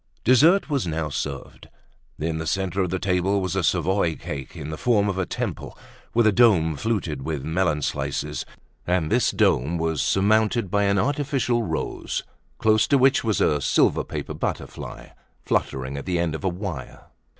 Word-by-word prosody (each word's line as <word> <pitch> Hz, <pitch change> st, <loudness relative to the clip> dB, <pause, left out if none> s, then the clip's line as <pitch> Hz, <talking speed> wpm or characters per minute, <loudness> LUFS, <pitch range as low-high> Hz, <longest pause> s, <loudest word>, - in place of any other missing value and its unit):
Dessert 155 Hz, -, +5 dB
was 140 Hz, -, -1 dB
now 80 Hz, -1 st, -2 dB
served. 70 Hz, -, -6 dB, 0.5 s
In 80 Hz, +1 st, -2 dB
the 80 Hz, -, -4 dB
centre 95 Hz, +2 st, -1 dB
of 90 Hz, -, 0 dB
the 95 Hz, -, -1 dB
table 95 Hz, +1 st, +1 dB
was 95 Hz, -1 st, -2 dB
a 95 Hz, -, +1 dB
Savoy 85 Hz, -1 st, +1 dB
cake 70 Hz, -2 st, -7 dB
in 75 Hz, +2 st, -6 dB
the -, -, -3 dB
form 105 Hz, -2 st, +2 dB
of 95 Hz, -2 st, -1 dB
a 95 Hz, -, -1 dB
temple, -, -, -4 dB, 0.4 s
with 120 Hz, -1 st, +4 dB
a 110 Hz, -, +5 dB
dome 95 Hz, -9 st, +4 dB
fluted 90 Hz, -7 st, -2 dB
with 75 Hz, -1 st, -3 dB
melon 80 Hz, -2 st, 0 dB
slices; -, -, -2 dB, 0.4 s
and 90 Hz, -3 st, 0 dB
this -, -, +3 dB
dome 75 Hz, +8 st, +2 dB
was 80 Hz, -2 st, -1 dB
surmounted 110 Hz, +1 st, +2 dB
by 100 Hz, 0 st, +2 dB
an 100 Hz, 0 st, +2 dB
artificial 135 Hz, +1 st, 0 dB
rose, 110 Hz, -, -3 dB, 0.3 s
close 110 Hz, -1 st, +3 dB
to 140 Hz, -, +4 dB
which 135 Hz, +1 st, +4 dB
was 110 Hz, -3 st, 0 dB
a 75 Hz, -1 st, +2 dB
silver -, -, +2 dB
paper -, -, -5 dB
butterfly, -, -, -5 dB, 0.4 s
fluttering 65 Hz, +1 st, -1 dB
at 70 Hz, -, -7 dB
the 90 Hz, -1 st, 0 dB
end 85 Hz, -2 st, 0 dB
of 80 Hz, -, -6 dB
a 95 Hz, -, +2 dB
wire. 90 Hz, -, -6 dB
95 Hz, 175 wpm, -24 LUFS, 80-110 Hz, 0.5 s, Dessert